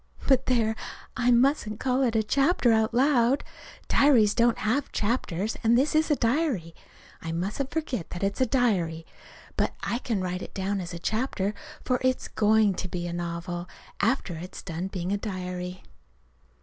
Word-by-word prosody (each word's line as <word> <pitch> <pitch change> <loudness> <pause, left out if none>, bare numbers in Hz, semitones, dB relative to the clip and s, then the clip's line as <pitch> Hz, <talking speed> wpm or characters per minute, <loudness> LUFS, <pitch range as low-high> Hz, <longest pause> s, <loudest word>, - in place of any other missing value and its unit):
But, 265 -1 +3
there 225 -3 +2 0.4
I 245 -1 +1
mustn't 240 -3 +3
call 255 0 +1
it 240 -4 +1
a 220 - +3
"chapter" 270 +2 +3
out 220 0 +3
loud. 255 +1 +3 0.4
Diaries 235 -8 +5
don't 235 0 +3
have 245 +7 0
chapters, 210 -3 -1
and 230 +1 +4
this 275 +4 +2
is 310 +1 +2
a 295 - +4
diary. 235 - 0 0.5
I 165 - -4
mustn't 200 +11 -2
forget 290 - -3
that 175 - -5
it's 200 +6 -1
a 255 - +4
diary. 185 -11 +1 0.5
But - - 0
I 235 - -1
can 230 -5 -2
write 180 0 -3
it - - -9
down 195 0 -1
as 175 0 -6
a - - -4
chapter, 215 +1 -1 0.3
for 250 -1 +1
it's 255 0 0
going 215 -1 +3
to 185 - -4
be 175 -1 -4
a 175 - -4
novel, 175 +1 -4 0.3
after 225 -4 +1
it's 180 +3 -8
got 175 - -7
done 175 +4 -3
being 185 -1 -4
a 205 - +1
diary. 180 -2 -5
220 Hz, 175 wpm, -27 LUFS, 180-255 Hz, 0.5 s, Diaries